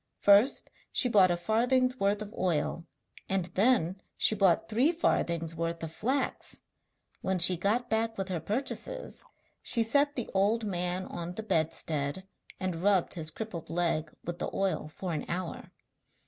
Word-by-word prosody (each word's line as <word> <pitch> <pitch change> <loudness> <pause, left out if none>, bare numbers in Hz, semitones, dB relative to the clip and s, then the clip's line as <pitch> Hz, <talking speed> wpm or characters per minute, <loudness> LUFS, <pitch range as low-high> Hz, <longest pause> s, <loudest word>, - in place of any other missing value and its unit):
First 205 +7 +4 0.2
she 255 - +1
bought 200 -6 +5
a 175 - +1
farthing's 250 +7 +1
worth 200 +2 +1
of 210 +1 -11
oil, 170 -2 -1 0.4
and 190 -2 +1
then 195 -4 +2 0.2
she - - +3
bought 195 -4 +3
three 245 +9 +3
farthings' 170 - 0
worth 165 0 -3
of 160 - -4
flax. 260 +9 -2 0.6
When 190 0 0
she 180 +1 +8
got 210 +8 0
back 225 0 -1
with 195 -1 -2
her 180 -3 -1
purchases 275 - -4 0.4
she 230 - +3
set 285 +5 +2
the 245 - -3
old 210 +4 +2
man 180 -1 -2
on 175 0 -6
the 220 - -5
bedstead 160 -2 0 0.3
and 185 -3 -3
rubbed 195 -2 +2
his 160 -3 -3
crippled 175 -1 -7
leg 165 -2 0
with 175 0 -5
the - - -2
oil 195 -5 -1
for 175 +3 -5
an 150 - -2
hour. 180 0 -4
190 Hz, 160 wpm, -30 LUFS, 170-225 Hz, 0.6 s, she